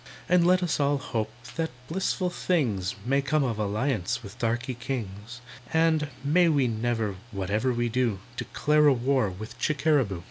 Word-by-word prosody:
And 180 -1 +4
let 180 0 +4
us 170 -3 0
all 145 0 +2
hope 110 -5 -3 0.3
that 165 -1 0 0.2
blissful 185 +1 -1
things 115 - 0
May 135 +3 +2
come 145 +2 +1
of 115 -5 -1
alliance 105 0 -1
with 100 - -11
darky 120 +3 -1
kings, 120 -2 -6 0.3
And, 160 -2 +3 0.2
may 170 +5 +4
we 140 -5 +3
never, 110 -3 -1
whatever 105 +5 0
we 120 0 0
do, 120 -3 0 0.2
Declare 150 +4 +2
a 145 - +6
war 130 -2 +1
with 110 +5 -9
Chickeraboo! 140 - +1
130 Hz, 155 wpm, -27 LUFS, 110-150 Hz, 0.3 s, a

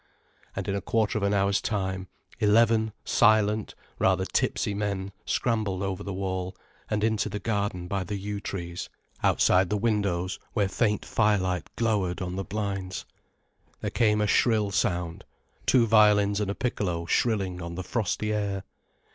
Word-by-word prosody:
And - - -4
in 100 - 0
a 100 - -2
quarter 110 -1 +1
of - - -4
an 100 - +2
hour's 100 0 +2
time, 95 -3 -2 0.3
eleven 110 0 +4
silent, 105 0 +3 0.2
rather - - +3
tipsy 105 - 0
men 100 -1 -2 0.2
scrambled 105 -6 0
over 95 -2 -2
the 100 - -5
wall, 95 -1 -3 0.3
and 105 -1 0
into 110 -1 +1
the 105 - -3
garden 100 -5 -2
by 100 0 -1
the 100 +3 -4
yew 100 +1 -4
trees, 85 -3 -5 0.3
outside 90 0 +4
the 105 - +1
windows 100 -5 0
where 100 -2 +2
faint 105 +1 0
firelight 95 -5 +1
glowered 105 -6 0
on 90 -1 -3
the 95 - -2
blinds. 95 -5 -3 0.8
There - - -2
came 105 -3 +3
a - - +3
shrill 105 -1 +3
sound, 90 -3 -1 0.4
two 125 -3 +5
violins 105 -2 +4
and 100 - -1
a 100 - -2
piccolo 90 -9 -2
shrilling 95 -2 0
on 85 0 -5
the 95 - -4
frosty 110 0 -1
air. 100 -2 -2
100 Hz, 155 wpm, -27 LUFS, 95-105 Hz, 0.8 s, two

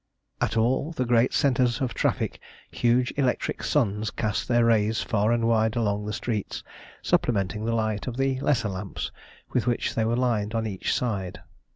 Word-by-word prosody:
At - - 0
all 130 +8 +1
the 130 -5 -1
great 120 +1 +3
centres 125 -4 +2
of 130 -3 -1
traffic - - -1 0.3
huge 120 +1 +2
electric 130 -3 0
suns 110 -6 +1
cast 105 0 -2
their 120 -1 +3
rays 110 -1 +2
far 105 0 +1
and 115 -1 +2
wide 110 -1 +2
along 105 -3 0
the - - -2
streets, 110 -2 -3 0.4
supplementing 105 -2 +1
the 115 0 0
light 110 -1 -1
of 125 -1 -4
the 135 -1 +1
lesser 130 -6 +1
lamps 95 +1 -5 0.4
with 125 -1 +1
which 120 - 0
they 110 - +1
were 115 +2 +1
lined 115 -4 0
on 115 0 0
each 100 -4 -2
side. 100 -7 -2
115 Hz, 175 wpm, -26 LUFS, 105-125 Hz, 0.4 s, great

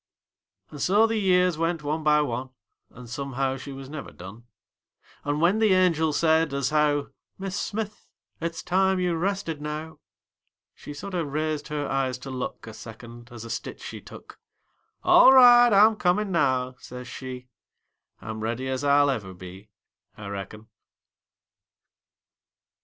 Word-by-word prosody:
And 145 - -8
so 205 +4 +4
the 225 -1 0
years 180 -4 +2
went 165 -1 -1
one 150 +2 -2
by 150 -1 +4
one, 130 -1 -4 0.4
An' 125 - -13
somehow 135 +2 -3
she 135 +1 -9
was 135 0 -9
never 145 0 -7
done; 105 +6 -12 0.8
An' 145 +1 -1
when 180 +6 +3
the 215 -4 +4
angel 165 -4 +2
said, 160 -1 +2
as 140 +1 -1
how 150 -1 +1 0.3
"Mis' 195 0 -4
Smith, 215 0 -5 0.3
it's 165 0 -4
time 190 +1 +2
you 180 -1 0
rested 165 -3 -2
now," 155 +1 -6 0.7
She 145 - -10
sorter 180 +2 -4
raised 155 0 -3
her 150 -1 -3
eyes 135 -2 -1
to 135 +1 -9
look 130 -1 -5
A 110 - -9
second, 120 +2 -11
as 120 -1 -9
a - - -9
stitch 115 - -6
she - - -8
took; - - -13 0.6
"All 345 -6 +7
right, 245 -2 +8
I'm 215 +2 +6
comin' 195 +1 0
now," 130 -6 +1
says 125 0 -9
she, 130 -1 -8 0.7
"I'm 110 0 -6
ready 115 +4 -3
as 130 +1 -3
I'll 145 0 +4
ever 100 -7 -5
be, 95 +3 -12 0.5
I 105 -1 -8
reckon." 100 +2 -7
150 Hz, 150 wpm, -25 LUFS, 125-180 Hz, 0.8 s, right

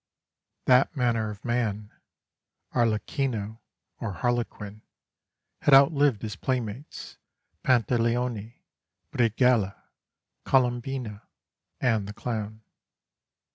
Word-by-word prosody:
That 130 +4 +4
manner 115 -4 +1
of 105 +1 -9
man 110 -4 -1 0.8
Arlecchino, 115 -1 -1 0.4
or 105 -4 -3
Harlequin 115 -3 -3 0.8
had 140 - +6
outlived 140 -5 +4
his 105 -1 -4
playmates, 125 +1 -4 0.4
Pantaleone, 120 -2 +1 0.6
Brighella, 115 -3 +2 0.7
Colombina, 125 -4 0 0.6
and 110 -5 +1
the 105 - -7
Clown. 110 -1 -5
115 Hz, 75 wpm, -27 LUFS, 105-125 Hz, 0.8 s, had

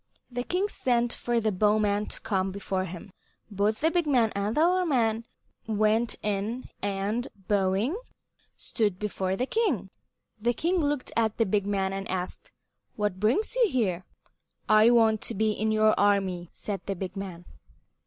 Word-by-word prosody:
The 245 0 -2
king 365 +10 0
sent 240 - +1
for 240 -1 0
the 220 -1 +1
bowman 210 +1 +2
to - - -6
come 190 -2 0
before 190 -1 -2
him. 180 +2 -9 0.4
Both 205 +2 0
the 320 +2 +3
big 345 -3 +1
man 240 -6 +3
and 200 +4 -1
the 320 +2 +5
little 365 0 +2
man 230 -5 +1 0.4
went 215 +2 +2
in 210 +4 -2
and, 205 +5 -1 0.2
bowing, 200 - +1 0.6
stood 210 -6 -1
before 190 -2 -2
the 250 - -1
king. 290 - 0 0.5
The 240 +2 +1
king 350 +8 +1
looked 290 -4 -1
at 220 -2 +1
the 225 - +3
big 200 0 0
man 195 -1 0
and 195 0 -4
asked, 185 -1 -5 0.4
"What 205 -3 -1
brings 235 - +1
you - - +3
here?" 195 - 0 0.6
"I 215 +1 +6
want 225 -3 +4
to - - -4
be 215 +2 +2
in 215 +1 -1
your 215 0 +4
army," 195 -4 +1
said 200 -3 -5
the 195 - -1
big 185 +1 -5
man. 185 -3 -6
215 Hz, 165 wpm, -27 LUFS, 195-240 Hz, 0.6 s, I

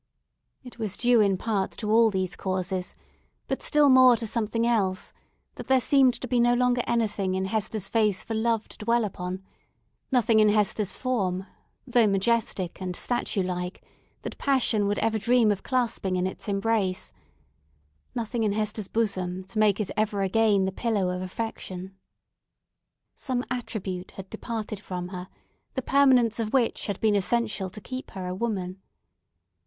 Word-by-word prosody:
It 250 -1 -12
was 210 -3 -2
due 240 -1 +4
in 195 -2 +3
part 200 -2 -1
to 210 -2 -3
all 225 0 +6
these 190 -3 -2
causes, 185 -1 -3 0.5
but - - -2
still 295 -1 +4
more 255 -2 +7
to 230 - -5
something 230 +1 -1
else, 195 -6 0 0.4
that - - -8
there 265 0 +5
seemed 260 -1 +4
to 255 - -4
be 245 0 +1
no 240 0 +4
longer 250 0 +2
anything 210 -5 0
in 190 0 -1
Hester's 215 0 -2
face 215 -3 +1
for 225 - -5
Love 225 0 0
to - - -12
dwell 230 +1 +2
upon; 185 -1 -5 0.7
nothing 235 -3 +4
in 215 -1 +5
Hester's 210 -1 +1
form, 195 -8 -1 0.4
though 240 -3 +4
majestic 195 -3 0
and 180 -1 -3
statue 235 -4 -1
like, 180 +1 -4 0.4
that - - -7
Passion 235 -7 +2
would 205 0 0
ever 220 -1 +1
dream 235 0 +4
of 200 - -2
clasping 235 -7 -1
in 180 0 0
its 190 - -5
embrace; 200 -2 0 1.0
nothing 235 0 -2
in 210 -2 +1
Hester's 210 -1 -2
bosom 190 -5 -1
to 195 +4 -5
make 210 -2 +3
it 210 - -2
ever 210 -2 0
again 205 0 +3
the 190 - -1
pillow 205 -3 0
of 180 - -4
Affection. 190 -2 -6 1.2
Some 250 -1 -3
attribute 195 -7 -4
had 190 -1 -10
departed 220 -3 -5
from 180 -3 -5
her, 180 -1 -7 0.5
the 260 - -2
permanence 255 -5 +4
of 220 -2 -2
which 250 -4 +1
had 200 -2 -3
been 220 -1 +3
essential 205 0 0
to 190 - -10
keep 255 +4 -7
her 185 - -4
a 180 - -3
woman. 190 -3 -3
215 Hz, 165 wpm, -26 LUFS, 190-235 Hz, 1.2 s, more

